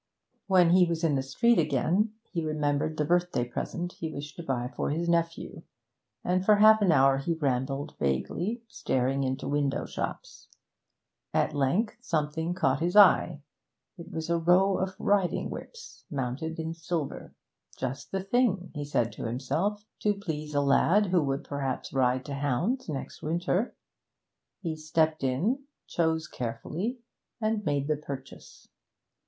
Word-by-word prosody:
When 180 -3 +5
he 180 0 +6
was 170 0 -2
in 160 -3 +3
the 135 - +1
street 230 - +2
again, 165 - +1 0.2
he 170 -4 -2
remembered 155 0 0
the 150 - +1
birthday 175 -5 +1
present 170 +8 -4
he 160 -1 -5
wished 145 -1 -7
to - - -5
buy 125 -3 -2
for - - -1
his 165 +4 -1
nephew, 170 -1 -1 0.6
and 180 +1 +1
for 210 +2 +6
half 215 +1 +7
an 190 -4 +4
hour 135 -2 +5
he 165 +5 -1
rambled 135 -1 -1
vaguely, 175 - -1
staring 135 - 0
into 130 +1 -2
shop - - -3
windows. 145 -1 -3 0.9
At - - +2
length 150 - +1
something 160 -3 -1
caught 135 -6 +1
his 175 +3 -1
eye; 175 -6 +6 0.5
it 170 -1 -10
was 160 0 -4
a 170 - +2
row 185 +4 +4
of 190 0 -2
riding 200 -3 +1
whips, 470 -1 -10
mounted 140 +4 -3
in 160 0 -3
silver; 165 -3 -4 0.4
just 135 +2 -4
the 190 -1 -2
thing, 195 -5 +1
he 145 -2 -4
said 120 -5 0
to - - -7
himself, 185 - -1
to 210 -1 +1
please 155 -6 -5
a 145 - +4
lad 170 +9 +4
who 180 -2 +2
would 135 -1 -1
perhaps 135 -3 -3
ride 130 -1 +2
to 145 - -5
hounds 145 - -1
next 140 -3 -5
winter. 175 +7 -1 0.9
He 165 -3 -2
stepped 155 0 0
in, 195 - 0 0.2
chose 160 -2 0
carefully, 155 - -4 0.4
and 215 -1 0
made 145 -4 0
the 155 -1 +1
purchase. 140 -3 -9
160 Hz, 155 wpm, -28 LUFS, 140-185 Hz, 0.9 s, half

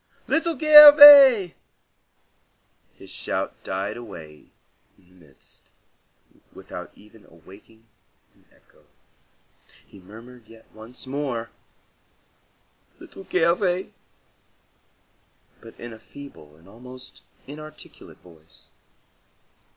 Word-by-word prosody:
Little 330 -1 -3
Gervais!" 290 - +7 1.4
His - - -17
shout - - -7
died 95 +4 -7
away 85 -10 -15 0.5
in 90 -2 -30
the 85 - -22
mist, 70 - -22 0.8
without - - -12
even 105 0 -22
awakening 100 +7 -22 0.5
an - - -33
echo. - - -31 1.0
He 100 - -20
murmured 115 +5 -18
yet 115 0 -20
once 110 +5 -15
more, 130 -4 -7 1.5
"Little 195 - -16
Gervais!" 180 +2 -2 1.7
but 115 - -18
in 120 -1 -11
a 110 - -16
feeble 110 - -17
and 80 +3 -25
almost 125 +4 -16 0.2
inarticulate 155 +2 -15
voice. 80 -3 -19
120 Hz, 90 wpm, -21 LUFS, -, 1.7 s, Gervais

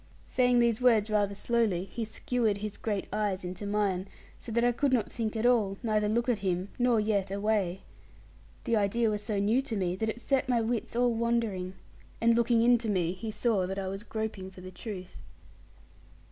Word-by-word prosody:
Saying 250 -1 +2
these 235 -1 +3
words 225 -4 +4
rather 205 -1 +1
slowly, 205 -4 +1
he 225 +4 -5
skewered 220 -1 -1
his 210 0 -5
great 205 -3 -2
eyes 205 -3 -1
into 185 +3 -5
mine, 200 -2 0 0.3
so 230 - -7
that 235 +1 +1
I 245 - +4
could 275 +3 0
not 240 -5 +1
think 225 -2 -3
at 220 +1 -1
all, 215 -6 +3
neither 215 -2 +1
look 235 +3 +1
at 240 -4 +1
him, 185 0 -1
nor 245 -2 +3
yet 210 -3 0
away. 200 -2 0 0.8
The 230 - +1
idea 215 +2 +2
was 210 -1 -2
so 210 -1 -2
new 215 +6 +2
to 255 -5 -5
me 180 -3 0
that 220 +2 -1
it 220 - -4
set 265 +1 0
my 245 -2 +3
wits 230 0 -2
all 245 0 +3
wandering; 225 -5 -1 0.4
and 230 0 +4
looking 235 0 +3
into 235 -2 +3
me, 180 -4 +1
he 205 +5 -6
saw 215 -4 +1
that 190 +1 -4
I 190 -1 -2
was 195 +1 -5
groping 220 -4 -4
for 185 -1 -13
the 185 0 -9
truth. 185 -1 -8
215 Hz, 200 wpm, -29 LUFS, 195-235 Hz, 0.8 s, words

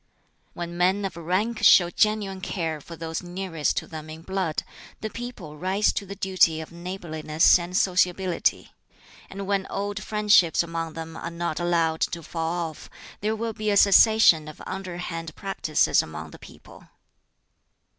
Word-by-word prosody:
"When 175 0 -6
men 190 +3 +2
of 195 - -4
rank 190 +7 -1
show 175 -4 +7
genuine 205 -3 0
care 165 -5 -3
for 170 - -10
those 165 0 -4
nearest 175 -3 -2
to - - -1
them 155 -1 -9
in 160 +1 -9
blood, 190 -4 -2 0.4
the 220 - -4
people 220 -11 -8
rise 190 +5 +1
to 200 - -4
the 200 - -7
duty 185 -5 +2
of 160 - -8
neighborliness 170 -2 +1
and 175 +2 -3
sociability. 180 -1 +1 0.6
And 195 0 -6
when 195 -1 -1
old 205 +1 -3
friendships 210 -7 +3
among 165 -1 -4
them 165 0 -7
are 170 - -5
not 170 -1 -3
allowed 165 -2 +1
to 170 -1 -1
fall 165 0 -2
off, 155 - -14 0.3
there 215 +2 -1
will 225 0 -3
be 215 0 -2
a 200 - +3
cessation 200 -6 +6
of 155 - -10
underhand 175 -3 -5
practices 195 -6 +1
among 80 0 -8
the - - -13
people." - - -15
175 Hz, 155 wpm, -25 LUFS, 165-195 Hz, 0.6 s, show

